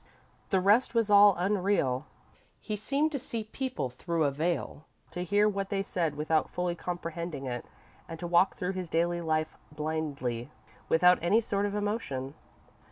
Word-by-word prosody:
The 190 - +3
rest 210 +7 +3
was 225 -2 +2
all 205 -1 +8
unreal. 180 -8 +1 0.5
He 215 - -4
seemed 280 +9 0
to 280 - -2
see 230 -2 -4
people 220 - -4
through 165 +5 -1
a 145 - +2
veil, 155 0 -2 0.3
to 180 - -4
hear 205 +3 +3
what 195 -2 -2
they 195 -1 0
said 165 -6 -1
without 155 +1 +1
fully 180 -1 -1
comprehending 170 -4 -5
it, 120 -2 -4 0.4
and 165 - -6
to 175 - -6
walk 175 +2 +3
through 185 +1 -2
his 185 -3 -5
daily 170 +1 +1
life 155 -1 -1
blindly, 150 -6 -3 0.4
without 180 +2 +5
any 185 +7 +4
sort 205 -2 -1
of 205 - -4
emotion. 205 - -2
175 Hz, 165 wpm, -29 LUFS, 155-205 Hz, 0.5 s, all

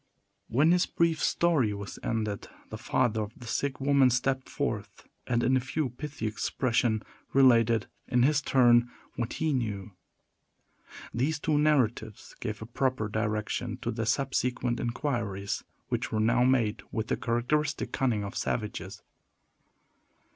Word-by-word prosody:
When 145 +8 +3
his 180 0 +3
brief 165 -2 +1
story 150 -11 +2
was 100 -1 -7
ended, 110 -3 -2 0.2
the - - -5
father 110 -2 +1
of 105 0 -5
the 120 - -11
sick 140 +4 -2
woman 140 -1 +4
stepped 130 +2 0
forth, - - -4 0.2
and, 120 -1 +1
in 130 +2 +3
a - - +4
few 135 +2 -2
pithy 145 -1 -6
expression, 115 0 0 0.3
related, 115 -4 +5 0.2
in 125 -1 +3
his 145 +1 +3
turn, 120 -4 +4 0.3
what 120 -1 -3
he 155 -1 0
knew. 105 -6 -2 1.2
These 145 +6 0
two 150 0 +1
narratives 120 -7 0
gave 110 -2 -4
a - - -7
proper 125 -2 -1
direction 105 0 -2
to - - -1
the 115 0 -3
subsequent 125 -3 0
inquiries, 115 -6 -2 0.3
which - - -2
were 110 - 0
now 120 +3 +3
made 120 -5 +2
with 110 - -2
the - - +2
characteristic 140 +6 0
cunning 120 -6 0
of 100 - -6
savages. 105 -3 -3
120 Hz, 140 wpm, -29 LUFS, 110-135 Hz, 1.2 s, related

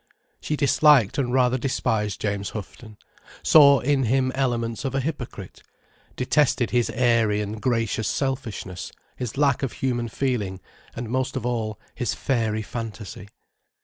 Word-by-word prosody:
She 150 - -2
disliked 145 -5 +4
and 125 -3 0
rather 130 0 +2
despised 110 -5 -1
James 100 -1 -2
Houghton, 105 +1 -9 0.5
saw 140 -3 +7
in 135 -1 +1
him 130 +2 +2
elements 120 -4 -1
of 135 -1 -2
a - - +2
hypocrite, 125 - -6 0.5
detested 125 -2 +2
his 120 -1 +2
airy 115 -4 +2
and 105 +1 -4
gracious 115 -3 0
selfishness, 120 -9 -3 0.2
his 125 0 -5
lack 140 -2 +2
of 135 - -2
human 120 -3 -2
feeling, 110 -7 -2 0.4
and 120 0 -5
most 130 +2 -1
of - - -3
all, 110 -4 -2
his 120 - -2
fairy 110 -4 -1
fantasy. 110 -3 -7
120 Hz, 140 wpm, -24 LUFS, 110-135 Hz, 0.5 s, saw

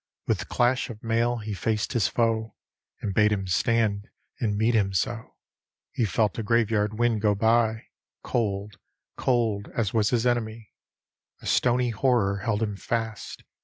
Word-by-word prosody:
With - - -1
clash 125 +1 +1
of 110 -2 -9
mail 115 +1 +1
he 105 -1 -5
faced 105 +3 -1
his 115 -5 +2
foe. 115 -2 0 0.5
And 100 - -2
bade 105 +1 +4
him 100 -2 -1
stand 105 +2 +1 0.3
and 105 -4 0
meet 110 +3 +2
him 100 -4 +2
so. 110 +5 -2 0.6
He 120 - 0
felt 105 +3 0
a - - 0
graveyard 110 -1 +1
wind 120 -2 +1
go 105 -1 +3
by 110 +1 +2 0.4
Cold, 100 -3 -2 0.4
cold 115 -5 0
as 110 -5 0
was 110 -2 +2
his 120 -1 +1
enemy. 115 -3 -1 0.7
A - - -10
stony 125 0 +2
horror 105 -4 +1
held 105 +2 -1
him 105 -2 -2
fast. 110 0 -4
110 Hz, 155 wpm, -26 LUFS, 105-115 Hz, 0.7 s, bade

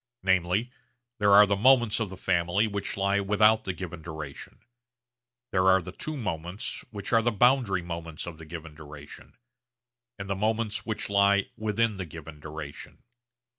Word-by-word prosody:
Namely, 95 +5 +1 0.5
there 105 -1 +4
are 105 +1 +9
moments 115 +3 +4
of 110 -3 -2
the 95 - -9
family 90 +2 +1
which 100 -2 -3
lie 100 +1 +2
without 105 +2 +3
the 95 - -1
given 85 -2 -7
duration, 80 -3 -8 0.9
there 95 0 +2
are 95 0 +6
the 90 0 -8
two 155 +10 -5
moments 90 - -4
which 100 +1 -6
are 115 - +5
the 120 - +2
boundary 120 -5 +3
moments 85 -2 -6
of 85 -2 -8
the 80 - -10
given 80 -1 -8
duration, 75 -1 -12 0.8
and 100 -1 -6
the 100 - -1
moments 110 +2 -1
which 110 - -2
lie 100 -1 +3
within 110 0 0
the 95 - -4
given 80 -1 -10
duration. 75 -1 -9
95 Hz, 160 wpm, -27 LUFS, 85-105 Hz, 0.9 s, are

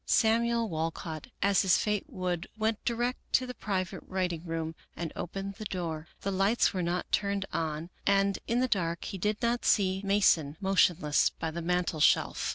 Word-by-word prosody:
Samuel 230 +1 +3
Walcott, 160 +1 -4 0.2
as 200 -1 +4
his 190 -3 +4
fate 210 -2 0
would, 180 -1 -3
went 220 0 0
direct 240 +1 0
to 255 - +4
the 250 - -6
private 185 -6 -3
writing 180 -3 -2
room 165 -1 -3 0.2
and 165 -1 -4
opened 195 +2 -4
the 215 - -5
door. 165 -5 -4
The 195 - -2
lights 195 +5 +2
were 185 - -1
not 175 +1 -2
turned 200 -1 0
on 160 +1 -2 0.2
and 195 0 +3
in 235 +2 +1
the 255 - +2
dark 170 -7 -1
he 195 - -5
did 210 +3 0
not 235 +1 +1
see 190 -2 +2
Mason 175 -7 +3
motion 190 -3 +3
less 150 -1 +3
by 160 - -5
the 170 +2 -4
mantel 175 -1 0
shelf. - - +3
190 Hz, 180 wpm, -30 LUFS, 170-210 Hz, 0.2 s, as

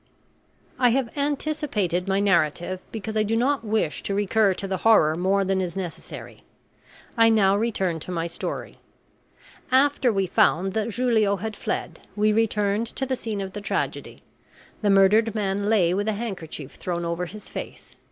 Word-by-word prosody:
I 250 -1 +5
have 240 -1 -1
anticipated 280 - -1
my 195 0 +1
narrative 185 -2 +1
because 220 0 -5
I 215 - +3
do 215 +1 0
not 265 +2 +1
wish 215 -8 -1
to 200 - -3
recur 205 -1 +2
to 195 - -4
the 190 -1 -2
horror 180 -8 +4
more 195 +3 +1
than 190 0 +1
is 180 -1 -4
necessary. 180 -4 -7 0.7
I 230 -1 +5
now 200 -3 +4
return 195 -6 -1
to 170 - -7
my 165 -2 -2
story. 170 - -5 0.9
After 265 -1 +3
we 195 -2 0
found 185 +1 +2
that 220 +1 -1
Julio 225 -5 +2
had 215 +2 -5
fled, - - -4 0.2
we 210 0 +2
returned 210 0 +1
to 265 - -3
the 260 0 -1
scene 220 -4 -4
of 190 -1 -6
the 205 - -6
tragedy. 205 - -3 0.6
The 210 - +1
murdered 205 +3 +4
man 200 -1 -1
lay 180 -6 +3
with 205 +3 -1
a 220 - +1
handkerchief 180 - -6
thrown 175 -1 -3
over 170 +1 -2
his 210 +4 -10
face. - - -8
205 Hz, 170 wpm, -24 LUFS, 190-225 Hz, 0.9 s, I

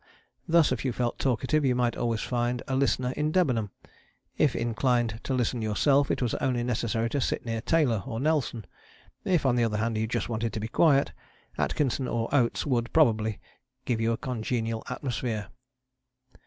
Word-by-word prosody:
Thus 170 -2 +4
if - - -1
you 130 - 0
felt 120 0 -2
talkative 135 +4 +1
you 130 -2 +2
might 120 -2 +1
always 115 -2 -1
find 120 0 -1
a 130 - -1
listener 130 -2 +1
in 150 +3 -1
Debenham; 125 - +1 0.7
if 150 -4 +2
inclined 120 -1 0
to 135 - -1
listen 125 -1 0
yourself 135 +6 +2
it - - 0
was 120 - -1
only 125 -3 0
necessary 115 -1 -1
to 140 - 0
sit - - -1
near 115 -1 -2
Taylor 130 -8 +2
or 115 -3 -4
Nelson; 135 - 0 0.6
if, 175 -6 +2
on 125 -2 +3
the 120 - +3
other 110 -2 0
hand, 110 0 -1
you 110 - 0
just 110 - -2
wanted 115 -1 -2
to - - -3
be 110 - -3
quiet, 140 +3 +3 0.4
Atkinson 135 -2 0
or 115 +3 -2
Oates 125 -5 +2
would, 120 -4 0
probably, 110 -8 +2 0.5
give 115 -3 0
you 115 +1 +2
a 115 - -1
congenial 115 -2 -2
atmosphere. 120 -5 -3
120 Hz, 180 wpm, -27 LUFS, 115-135 Hz, 0.7 s, Thus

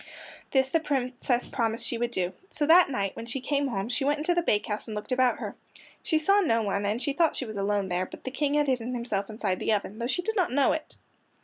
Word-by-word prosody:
This 265 -1 +3
the 330 - +2
Princess 255 -4 -1
promised 230 -3 -1
she 235 - -2
would 240 0 0
do. 185 -6 -2 0.2
So 300 - -1
that 340 +2 +7
night, 200 -7 -2
when 230 - -7
she 245 +3 -3
came 280 +2 0
home, 200 -5 -2
she 250 +3 -1
went 290 +2 +2
into 315 +4 +1
the 345 - +2
bakehouse 210 -7 -1
and 215 - -5
looked 210 +4 -6
about 255 -1 +3
her. - - -6 0.5
She 320 - +1
saw 395 +6 +4
no 230 - +2
one, 200 0 -1
and 210 +3 0
she 280 +2 -1
thought 330 +1 +2
she 260 - -3
was 215 -2 -7
alone 200 0 0
there, 180 +1 -1
but - - -12
the 260 - -4
King 290 +1 0
had 295 0 +3
hidden 250 -2 -1
himself 215 -4 -2
inside 210 -4 -2
the - - 0
oven, 210 +1 -2
though 235 - -1
she 355 +7 -1
did 445 +3 -2
not 370 - +1
know 275 +1 +3
it. 315 - -4
250 Hz, 255 wpm, -27 LUFS, 215-290 Hz, 0.5 s, that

